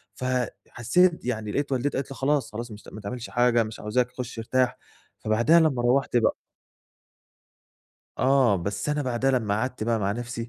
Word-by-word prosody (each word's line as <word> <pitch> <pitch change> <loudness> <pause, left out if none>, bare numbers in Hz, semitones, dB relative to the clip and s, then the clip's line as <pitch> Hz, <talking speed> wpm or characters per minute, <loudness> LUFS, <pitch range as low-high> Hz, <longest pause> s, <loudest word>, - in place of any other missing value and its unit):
ف 130 - -5 0.4
حسّيت 175 +8 +2
يعني 110 -4 -2
لقيت 145 +5 -2
والدتي 135 +2 0
قالت 135 0 -4
لي - - -6
خلاص، 135 -3 0
خلاص، 115 +2 -6
مش 105 -1 -11
ما 110 - -9
تعملش 120 +4 -6
حاجة، 120 -1 +3
مش 110 0 -8
عاوزاك، 125 +4 0
خُشّ 125 -2 -5
أرتاح. 125 +2 0 0.4
فبعدها، 120 +10 +4
لمّا 150 -7 +2
رُوَّحت 125 0 +2
بقى 115 - +2 1.8
آه، 130 -6 +4
بس 100 - -3
أنا 150 0 0
بعدها 130 +1 0
لمّا 110 -6 +1
قعدت 125 +2 -2
بقى 115 0 +1
مع 100 0 0
نفسي، 120 0 -5
120 Hz, 170 wpm, -26 LUFS, 110-135 Hz, 1.8 s, فبعدها